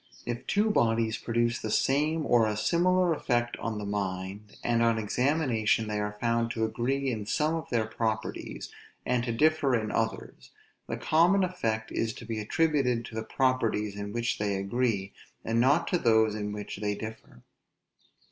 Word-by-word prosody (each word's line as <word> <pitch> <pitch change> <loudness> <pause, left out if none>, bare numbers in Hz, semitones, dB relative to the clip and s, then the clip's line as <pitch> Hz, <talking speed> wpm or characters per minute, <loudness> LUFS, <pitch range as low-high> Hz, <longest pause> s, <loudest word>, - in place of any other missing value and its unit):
If 120 0 -4
two 210 +2 +2
bodies 115 - +1
produce 120 0 0
the 110 - -3
same 150 +7 +1
or 115 -4 +4
a 105 -1 -2
similar 175 +8 +3
effect 120 -5 0
on 115 -2 -3
the 105 - -4
mind, 100 0 -4
and 120 -1 +2
on 115 -1 +3
examination 115 -1 +1
they 105 -1 -2
are 105 0 -3
found 115 0 +1
to 110 -1 0
agree 130 +4 -1
in 105 -3 -4
some 155 +6 +1
of 165 -3 -4
their 115 -3 +1
properties, 110 0 -3 0.3
and 125 -1 +1
to 120 - -1
differ 150 +2 +3
in 110 -2 -1
others; 110 0 -3 0.4
the - - -3
common 175 +5 +3
effect 115 -12 -2
is 115 -1 -1
to 115 - -10
be 110 -1 -3
attributed 125 0 +1
to - - -10
the 110 - -2
properties 110 -4 0
in 100 0 -5
which 120 +1 -1
they 100 -1 0
agree, 100 0 -1 0.3
and 115 +1 +2
not 140 +7 +3
to 180 - +1
those 110 -4 +4
in 105 -1 -3
which 105 -1 -6
they 105 0 -1
differ. 110 - -9
115 Hz, 175 wpm, -28 LUFS, 110-135 Hz, 0.4 s, or